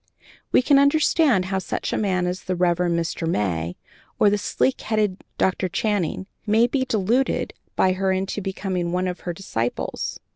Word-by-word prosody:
We -, -, +4 dB
can 280 Hz, +1 st, +5 dB
understand 280 Hz, -, +3 dB
how 190 Hz, +1 st, -1 dB
such 185 Hz, -, -3 dB
a -, -, 0 dB
man 185 Hz, -4 st, +1 dB
as 180 Hz, +2 st, -3 dB
the 185 Hz, -, -1 dB
Rev. 175 Hz, -1 st, +2 dB
Mr. 170 Hz, -1 st, -1 dB
May, 85 Hz, -, -1 dB, 0.4 s
or 205 Hz, -, +5 dB
the 205 Hz, -, +2 dB
sleek 260 Hz, +5 st, 0 dB
headed 210 Hz, -3 st, -1 dB
Dr. 185 Hz, 0 st, +1 dB
Channing, 190 Hz, -2 st, -1 dB, 0.2 s
may 220 Hz, +3 st, +5 dB
be 260 Hz, +2 st, 0 dB
deluded 235 Hz, +2 st, 0 dB, 0.2 s
by 185 Hz, -, +3 dB
her 190 Hz, 0 st, 0 dB
into 190 Hz, +2 st, -2 dB
becoming 185 Hz, -2 st, -2 dB
one 180 Hz, +1 st, 0 dB
of 180 Hz, 0 st, -4 dB
her 175 Hz, -, -4 dB
disciples. 120 Hz, -10 st, -3 dB
190 Hz, 170 wpm, -23 LUFS, 180-215 Hz, 0.4 s, can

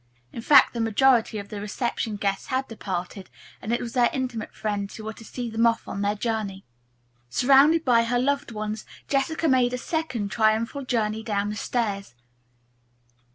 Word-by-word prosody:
In 230 Hz, -, -6 dB
fact, 285 Hz, +5 st, +6 dB
the 235 Hz, -, -4 dB
majority 225 Hz, 0 st, +3 dB
of 200 Hz, -1 st, -7 dB
the 210 Hz, -2 st, -6 dB
reception 220 Hz, +1 st, -2 dB
guests 200 Hz, -1 st, -2 dB
had 260 Hz, -1 st, -1 dB
departed, 190 Hz, -3 st, -5 dB, 0.3 s
and 220 Hz, -, -4 dB
it 240 Hz, -, +1 dB
was 230 Hz, -, -5 dB
their 245 Hz, -2 st, +4 dB
intimate 250 Hz, -4 st, -3 dB
friends 205 Hz, -2 st, -3 dB
who 220 Hz, -, -8 dB
were 220 Hz, +1 st, -5 dB
to 225 Hz, -, -13 dB
see 245 Hz, +2 st, -5 dB
them 230 Hz, +1 st, +2 dB
off 230 Hz, 0 st, 0 dB
on 200 Hz, -, -4 dB
their 205 Hz, +1 st, +1 dB
journey. 210 Hz, -3 st, -3 dB, 0.6 s
Surrounded 280 Hz, -, +5 dB
by 235 Hz, -3 st, +4 dB
her 245 Hz, +1 st, 0 dB
loved 280 Hz, +1 st, 0 dB
ones, 215 Hz, 0 st, -4 dB, 0.2 s
Jessica 305 Hz, +4 st, 0 dB
made 255 Hz, -3 st, +3 dB
a -, -, -1 dB
second 255 Hz, -, -3 dB
triumphal 225 Hz, +5 st, +1 dB
journey 220 Hz, -3 st, 0 dB
down 205 Hz, -2 st, -1 dB
the -, -, -5 dB
stairs. 205 Hz, -, -2 dB
230 Hz, 175 wpm, -25 LUFS, 210-250 Hz, 0.6 s, fact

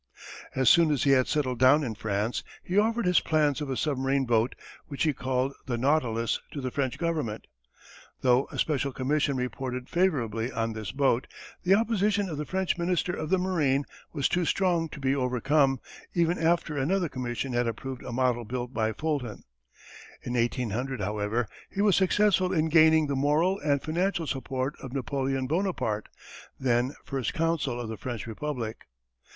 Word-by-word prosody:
As 130 Hz, -1 st, +1 dB
soon 170 Hz, -2 st, +6 dB
as 145 Hz, -4 st, +1 dB
he 140 Hz, -, +4 dB
had 130 Hz, -2 st, +4 dB
settled 130 Hz, -5 st, -1 dB
down 135 Hz, +4 st, +6 dB
in 120 Hz, -5 st, -2 dB
France, 105 Hz, +2 st, -2 dB, 0.2 s
he 180 Hz, -, -4 dB
offered 225 Hz, +2 st, +2 dB
his 180 Hz, 0 st, +5 dB
plans 150 Hz, -2 st, +1 dB
of 145 Hz, -, -3 dB
a 130 Hz, -, -2 dB
submarine 135 Hz, -2 st, 0 dB
boat 115 Hz, 0 st, +1 dB, 0.3 s
which 140 Hz, -4 st, -2 dB
he 155 Hz, -, +2 dB
called 130 Hz, +1 st, -1 dB
the 120 Hz, -2 st, -1 dB
Nautilus 120 Hz, -4 st, +1 dB
to 145 Hz, -, -4 dB
the 130 Hz, -2 st, -3 dB
French 130 Hz, -2 st, -1 dB
Government. 155 Hz, -11 st, -2 dB, 0.8 s
Though 125 Hz, +1 st, +3 dB
a -, -, -9 dB
special 140 Hz, -3 st, 0 dB
commission 140 Hz, +1 st, 0 dB
reported 125 Hz, 0 st, -4 dB
favourably 125 Hz, -, 0 dB
on 115 Hz, -2 st, -2 dB
this 110 Hz, -3 st, -5 dB
boat, 135 Hz, -2 st, +1 dB, 0.3 s
the 190 Hz, +2 st, +4 dB
opposition 210 Hz, -2 st, +1 dB
of 150 Hz, -3 st, -4 dB
the 150 Hz, -, -4 dB
French 190 Hz, -1 st, -1 dB
Minister 175 Hz, 0 st, 0 dB
of 155 Hz, -2 st, -4 dB
the 190 Hz, -, +3 dB
Marine 155 Hz, -7 st, +1 dB, 0.3 s
was 140 Hz, -4 st, +1 dB
too 180 Hz, -, +1 dB
strong 170 Hz, -2 st, +1 dB
to 150 Hz, -, -9 dB
be 135 Hz, 0 st, +1 dB
overcome, 135 Hz, +1 st, +2 dB, 0.4 s
even 170 Hz, 0 st, +2 dB
after 165 Hz, -1 st, +1 dB
another 170 Hz, +6 st, +1 dB
commission 125 Hz, -1 st, -4 dB
had 120 Hz, 0 st, +1 dB
approved 130 Hz, +3 st, -5 dB
a -, -, -7 dB
model 125 Hz, -1 st, +1 dB
built 125 Hz, +2 st, -4 dB
by 110 Hz, -2 st, 0 dB
Fulton. 140 Hz, -5 st, -3 dB, 0.8 s
In 120 Hz, -, -4 dB
1800, 125 Hz, +1 st, -1 dB
however, 105 Hz, +3 st, -1 dB, 0.2 s
he 200 Hz, -, -1 dB
was 205 Hz, -3 st, +4 dB
successful 190 Hz, -1 st, +3 dB
in 160 Hz, -3 st, +1 dB
gaining 160 Hz, -1 st, +6 dB
the 140 Hz, -1 st, -1 dB
moral 155 Hz, +8 st, +2 dB
and 145 Hz, -2 st, 0 dB
financial 175 Hz, +2 st, 0 dB
support 135 Hz, -1 st, -2 dB
of 130 Hz, -2 st, -8 dB
Napoleon 135 Hz, 0 st, -1 dB
Bonaparte, 155 Hz, -, -1 dB, 0.5 s
then 125 Hz, +1 st, +1 dB
First 135 Hz, -3 st, -3 dB
Consul 160 Hz, -7 st, 0 dB
of 120 Hz, -, -4 dB
the 110 Hz, 0 st, -5 dB
French 120 Hz, -5 st, -5 dB
Republic. 115 Hz, -1 st, -5 dB
135 Hz, 170 wpm, -28 LUFS, 125-160 Hz, 0.8 s, soon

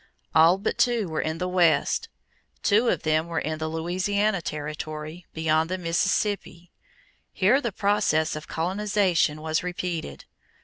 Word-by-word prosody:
All 165 Hz, +4 st, +6 dB
but 200 Hz, -, -3 dB
two 235 Hz, -5 st, +2 dB
were 160 Hz, -1 st, -2 dB
in 160 Hz, +1 st, -2 dB
the 180 Hz, -, -2 dB
West. 175 Hz, -, +2 dB, 0.5 s
Two 220 Hz, +4 st, +3 dB
of -, -, +1 dB
them 155 Hz, +1 st, +1 dB
were 170 Hz, -1 st, -4 dB
in 155 Hz, 0 st, -2 dB
the 160 Hz, -, -2 dB
Louisiana 185 Hz, +5 st, 0 dB
territory 155 Hz, +2 st, -6 dB
beyond 160 Hz, 0 st, +1 dB
the 185 Hz, -, -1 dB
Mississippi. 180 Hz, 0 st, -1 dB, 0.6 s
Here 215 Hz, +9 st, +3 dB
the 235 Hz, -, -2 dB
process 200 Hz, -7 st, +1 dB
of 155 Hz, -, -7 dB
colonization 185 Hz, -3 st, 0 dB
was 160 Hz, 0 st, 0 dB
repeated. 175 Hz, -, -4 dB
170 Hz, 140 wpm, -25 LUFS, 155-200 Hz, 0.6 s, All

